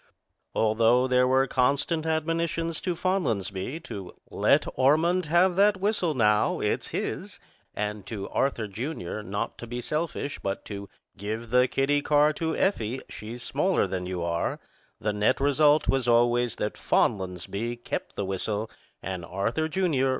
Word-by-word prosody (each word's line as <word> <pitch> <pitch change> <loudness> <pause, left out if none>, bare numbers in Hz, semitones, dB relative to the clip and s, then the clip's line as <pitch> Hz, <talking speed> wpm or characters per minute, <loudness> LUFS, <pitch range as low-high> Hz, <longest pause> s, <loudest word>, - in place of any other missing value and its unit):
Although 115 +3 +3
there 125 0 +4
were 130 +1 +4
constant 140 +5 +1
admonitions 165 +1 -1
to 180 -2 -1
Fonlansbee 140 - -1
to 95 - -7 0.2
"Let - - +3
Ormond 165 +7 +3
have 175 +3 +4
that 200 0 +4
whistle 190 -5 0
now; 105 -3 +3
it's - - -1
his," - - -4 0.4
and 105 -1 -3
to 100 -4 -5
Arthur, 120 -5 0
Jr., 110 - -5
not 100 0 -4
to 120 - -7
be 120 +1 -4
selfish, 150 +3 -3
but 95 0 -4
to 100 -1 -7 0.3
"give 110 +3 -5
the 125 +1 +5
kiddie 140 +3 +1
car 150 +1 +4
to 160 +1 -2
Effie; 130 - 0
she's 115 +3 -7
smaller 180 - +1
than 90 -1 -3
you 90 -2 -3
are," 85 0 -1 0.4
the 105 - -1
net 105 +4 +2
result 145 +2 +4
was 135 -2 +1
always 120 0 +3
that 105 - -3
Fonlansbee 100 +3 0
kept - - -4
the 100 - -2
whistle 105 +3 -2 0.3
and 95 -1 -4
Arthur, 105 - -1
Jr. 160 -6 +1
125 Hz, 150 wpm, -27 LUFS, 105-155 Hz, 0.4 s, the